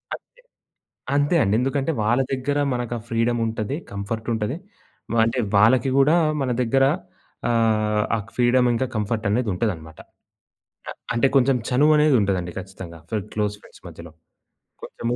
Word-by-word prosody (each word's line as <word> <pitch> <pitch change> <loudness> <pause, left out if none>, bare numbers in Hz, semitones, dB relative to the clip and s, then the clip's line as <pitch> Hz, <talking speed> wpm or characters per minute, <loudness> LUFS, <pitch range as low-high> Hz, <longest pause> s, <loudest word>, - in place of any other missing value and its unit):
అంతే. - - -15 0.9
అంతే 145 +4 +2
అండి. 100 - +1
ఎందుకంటే 135 +3 -1
వాళ్ళ 120 +5 +2
దగ్గర 135 +2 -1 0.2
మనకా 120 -1 -3
ఫ్రీడముంటది. 115 +1 -1 0.2
కంఫర్టుంటది. 110 +4 -3 0.7
అంటే 115 +3 -1 0.2
వాళ్ళకి 120 +5 +4
గూడా 150 +5 +5 0.3
మన 130 - -1
దగ్గర 135 +3 +2 0.6
ఆహ్, 110 -2 +1
ఆ - - +2
క్ - - -15
ఫ్రీడమ్ 125 0 +3
ఇంకా 130 +3 0
కంఫర్టనేది 110 +1 -1
ఉంటదనమాట. 85 -5 -3 0.9
ఆ - - -4 0.2
అంటే 120 +4 +3
కొంచెం 135 0 +4
చనువనేది 150 +2 +4
ఉంటదండి 95 -3 -1
ఖచ్చితంగా, 95 -3 -10
ఫ్ - - -10 0.2
క్లోజ్ 105 -1 -1
ఫ్రెండ్స్ - - -18
మధ్యలో. 85 -1 -11 0.7
కొంచెము 120 +1 -4
115 Hz, 125 wpm, -23 LUFS, 105-130 Hz, 0.9 s, గూడా